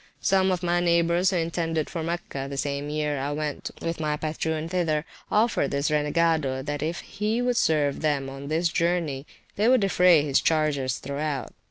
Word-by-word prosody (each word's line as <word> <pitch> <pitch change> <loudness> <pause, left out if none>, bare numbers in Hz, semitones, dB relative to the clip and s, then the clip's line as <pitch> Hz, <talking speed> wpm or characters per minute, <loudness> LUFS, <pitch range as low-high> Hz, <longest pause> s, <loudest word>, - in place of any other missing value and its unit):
Some 190 0 +3
of 180 -1 -2
my 175 0 +2
neighbours 170 +1 +3
who 195 - -1
intended 165 -1 -1
for 170 - -4
Mecca, 160 -5 -4
the 140 - -5
same 140 +1 -2
year 150 -1 -1
I 140 +2 -2
went 150 -1 -3
with 165 0 -2
my 150 -1 -1
patroon 160 +1 -2
thither, 165 -3 0 0.3
offered 220 +2 +2
[p.385] - - -11
this 140 +2 0
renegado 150 -3 +1
that 145 -1 -3
if 165 +3 -2
he 210 +3 -2
would 245 0 +1
serve 145 -3 +2
them 145 -3 0
on 135 +1 -8
this 165 +3 +1
journey 165 -5 -1 0.3
they 210 +3 +3
would 255 -1 +5
defray 180 -5 +5
his 140 -2 +2
charges 145 -5 +1
throughout. 140 -1 -4
155 Hz, 185 wpm, -26 LUFS, 145-175 Hz, 0.3 s, would